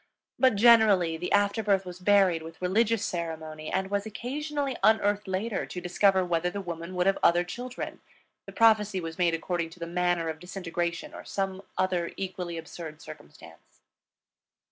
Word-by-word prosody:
But 255 -3 +4
generally 205 -6 +5
the 175 +2 -5
after 205 +2 +2
birth 195 -2 +1
was 180 0 -8
buried 185 -3 +4
with 165 0 -10
religious 215 +4 +1
ceremony, 160 -2 -5
and 190 +1 -1
was 200 +1 -1
occasionally 280 +4 -3
unearthed 210 -2 +3
later 195 +4 -2
to 180 - -6
discover 190 +1 +2
whether 175 0 0
the 200 - -5
woman 170 -1 -6
would 180 0 +1
have 195 0 +2
other 175 +1 +4
children; 245 +8 -6 0.5
the - - -7
prophecy 215 -4 +3
was 165 0 -7
made 170 -2 +3
according 170 0 -2
to 170 +2 -15
the 170 - -4
manner 175 -1 0
of 160 -1 -4
disintegration 175 -2 -4
or - - -9
some 195 -1 -3 0.2
other 185 -2 0
equally 180 -3 -4
absurd 160 -1 -8
circumstance. 145 - -14
185 Hz, 165 wpm, -28 LUFS, 170-205 Hz, 0.5 s, generally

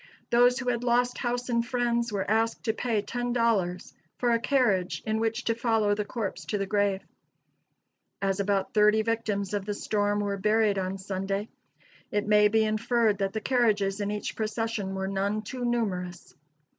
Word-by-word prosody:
Those 245 +1 +5
who 255 -2 -2
had 240 -1 -1
lost 245 0 +1
house 245 0 -2
and 235 -1 +1
friends, 235 -1 0
were 200 -2 -2
asked 225 +2 +1
to 220 - 0
pay 225 -2 -1
ten 245 +1 -3
dollars 205 -7 0 0.2
for 240 -1 +1
a 230 - +3
carriage 230 -9 +1
in 220 0 0
which 225 +1 -1
to 230 - +1
follow 225 -3 +1
the 210 0 -2
corpse 215 -2 -4
to 210 - -2
the 195 - -1
grave. 200 -1 0 1.2
As 195 0 -1
about 195 -1 0
thirty 210 +1 +4
victims 215 -3 -1
of 205 -1 -1
the 205 +1 -3
storm 205 0 0
were 200 -1 -2
buried 210 0 +2
on 190 +1 -3
Sunday, 195 +2 -3 0.6
it 205 0 -1
may 210 0 +5
be 220 +1 +3
inferred 215 0 +1
that 195 -1 -1
the 220 - -3
carriages 210 -6 +1
in 205 - -1
each 210 0 -4
procession 215 -2 -2
were 190 0 -2
none 200 +2 -1
too 250 +4 -6
numerous. 185 -7 -2
215 Hz, 180 wpm, -27 LUFS, 200-235 Hz, 1.2 s, Those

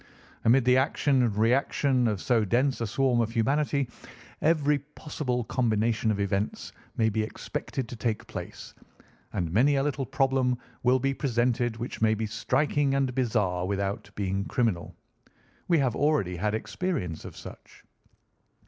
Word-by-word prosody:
Amid 125 +2 +5
the 125 0 +5
action 135 0 +2
and 115 -4 +1
reaction 125 +2 +2
of 105 -3 -1
so 120 -3 +3
dense 125 +5 +1
a 115 - 0
swarm 125 +2 +2
of 115 - 0
humanity, 140 +3 +1 0.5
every 150 -2 +3
possible 140 -3 -4
combination 110 -1 +1
of 105 -2 0
events 100 +1 -2 0.3
may 110 - +3
be 110 0 0
expected 115 +3 -4
to 120 - -7
take 115 -2 -2
place, - - -8 0.6
and 85 -3 -2
many 135 +9 +4
a 135 - +2
little 140 -3 -2
problem 135 -2 +1 0.2
will 125 +1 +4
be 135 +1 0
presented 120 -3 0
which 120 0 -6
may 110 0 +4
be 110 +1 -2
striking 145 +5 +1
and 135 -2 +1
bizarre 105 -8 0
without 100 +1 -2
being 95 -1 -1
criminal. 110 -9 -1 0.7
We 170 - +4
have 130 -5 +1
already 140 - +1
had 105 +4 0
experience 110 - -3
of - - -10
such." - - -12
120 Hz, 150 wpm, -27 LUFS, 110-135 Hz, 0.7 s, Amid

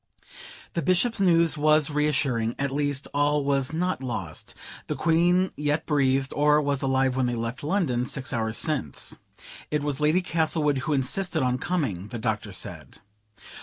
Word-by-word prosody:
The 170 - -1
Bishop's 185 - +1
news 170 -4 +3
was 155 0 +3
reassuring: 135 -6 0
at 140 0 -2
least 145 0 -1
all 145 0 +1
was 140 0 +1
not 180 -2 -1
lost; 100 -11 -6 0.3
the - - -2
Queen 175 +3 +2
yet 150 +1 -1
breathed, 135 -2 +1
or 150 +1 +4
was 140 -2 0
alive 130 -1 +1
when 130 -1 +1
they 120 - -1
left 115 +2 -4
London, 145 -8 0
six 135 -1 -4
hours 110 -1 -1
since. 140 - 0 0.5
("It 150 -1 -1
was 145 -2 -1
Lady 155 +5 +2
Castlewood 155 -4 +1
who 155 +3 -2
insisted 150 +4 0
on 125 0 0
coming," 135 - -2
the 120 - -6
Doctor 110 -2 -2
said.) 90 - -5
145 Hz, 160 wpm, -25 LUFS, 130-160 Hz, 0.5 s, or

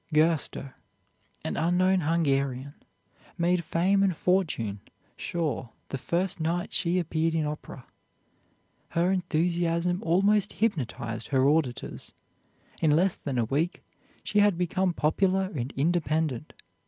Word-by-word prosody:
Gerster, 155 -3 +1 0.7
an 80 - -2
unknown 185 +3 +3
Hungarian, 140 -4 0 0.6
made 175 +1 +2
fame 185 +5 +2
and 190 -5 +2
fortune 150 - 0 0.4
sure 155 -8 -3 0.2
the 135 - -4
first 175 +4 -1
night 170 +2 -1
she 175 0 +1
appeared 165 -1 0
in 160 -2 +1
opera. 150 -4 -6 1.0
Her 175 +2 +1
enthusiasm 175 0 0
almost 200 +4 +2
hypnotized 130 - -2
her 135 -1 +3
auditors. 145 -5 -1 0.7
In 160 - +4
less 185 +3 +3
than 135 -4 -4
a 120 - +2
week 150 +9 -1 0.4
she 210 - +1
had 205 -4 +4
become 180 +1 +1
popular 185 +4 +1
and 125 0 -3
independent. 155 -2 0
165 Hz, 115 wpm, -27 LUFS, 145-180 Hz, 1.0 s, In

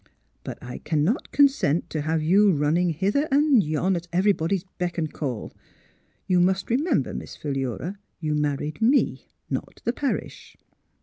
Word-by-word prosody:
But - - -6
I 125 0 -7
cannot 155 - 0
consent 265 - +3
to 155 - -2
have 160 +1 0
you 195 +5 +5
running 155 +4 +2
hither 200 - 0
and 280 -5 +4
yon 165 +5 0
at 170 0 -5
everybody's 185 -1 +1 0.2
beck 180 0 -2
and 155 -3 -2
call. 130 -8 -4 0.7
You 180 -1 +3
must 190 +4 +1
remember, 265 - +1
Miss - - -7
Philura, 140 - -3 0.2
you 155 -3 -1
married 150 +3 -2
me, 255 +6 +2 0.2
not - - -5
the 235 - +1
parish." 275 0 -4
175 Hz, 145 wpm, -25 LUFS, 150-205 Hz, 0.7 s, you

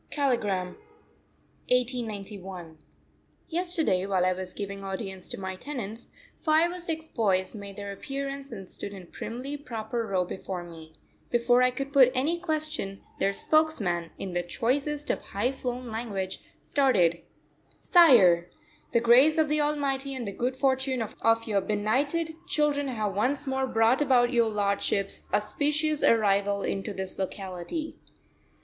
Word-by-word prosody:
KALIGRAM, 210 -10 0 1.0
1891. 205 -9 -2 0.7
Yesterday, 335 - +2
while 185 -2 +2
I 185 - +3
was 185 0 -7
giving 200 -1 -5
audience 195 -1 -5
to - - -5
my 190 -1 -4
tenants, 230 -2 -6 0.3
five 320 +2 +3
or 360 - -6
six 320 -2 -4
boys 190 -8 0
made 200 -2 -8
their 200 0 -6
appearance 275 +4 -5
and 195 -4 -8
stood 200 +2 -8
in 190 - -9
a - - -14
primly 255 +10 -6
proper 230 -4 -4
row 185 -3 +1
before 185 0 -5
me. 160 -2 -12 0.3
Before 245 +1 +3
I 250 - +5
could 275 +2 -5
put 260 -3 +7
any 310 +7 +1
question 310 - -3 0.2
their 195 - +2
spokesman, 205 - +1
in 190 -2 -5
the 175 - +1
choicest 280 - -1
of - - -3
high 210 +6 -1
flown 250 -2 -5
language, 205 -5 -3 0.2
started: 180 - +2 0.6
"Sire! 195 - +6 0.4
the 235 - +5
grace 255 +7 +6
of 315 -2 +3
the 300 0 +2
Almighty 280 -2 -1
and 245 -4 -4
the - - -3
good 250 +5 -2
fortune 265 -2 +1
of 215 - -8 0.3
your 205 -2 +1
benighted 270 - 0
children 295 -3 +1
have 215 -6 -2
once 265 +8 0
more 265 -1 0
brought 230 +3 +3
about 255 -3 +3
your 235 -2 +3
lordship's 200 -1 0
auspicious 295 +8 0
arrival 200 -2 +3
into 195 +2 -2
this 190 -1 -6
locality." 190 - -5
235 Hz, 145 wpm, -28 LUFS, 195-280 Hz, 1.0 s, put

